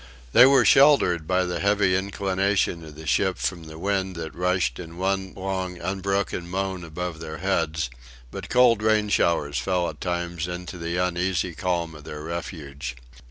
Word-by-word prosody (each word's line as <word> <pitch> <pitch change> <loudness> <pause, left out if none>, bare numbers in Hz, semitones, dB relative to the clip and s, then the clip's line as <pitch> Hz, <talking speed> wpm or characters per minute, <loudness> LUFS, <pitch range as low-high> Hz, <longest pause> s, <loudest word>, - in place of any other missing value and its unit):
They 125 - +9
were 135 -3 +5
sheltered 100 - +5
by 90 0 +2
the 90 -1 -3
heavy 100 -1 +2
inclination 95 -2 0
of 75 -2 -11
the 80 +1 -10
ship 95 +5 +1
from 85 -3 -3
the 80 0 -10
wind 95 +1 -1
that 80 -1 -6
rushed 90 0 0
in 85 -1 -9
one 95 0 -1
long 95 -1 -3
unbroken 95 0 -2
moan 95 -1 -2
above 85 +1 -5
their 80 -1 -6
heads, 80 -6 -1 0.4
but - - -7
cold 125 -3 +5
rain 110 -1 +2
showers 75 -8 +1
fell 90 +7 0
at - - -11
times 85 -1 -2
into 90 0 -6
the 85 +1 -3
uneasy 90 0 0
calm 85 -1 -2
of 75 -2 -12
their 75 0 -7
refuge. 75 -6 -6
90 Hz, 165 wpm, -25 LUFS, 85-95 Hz, 0.4 s, They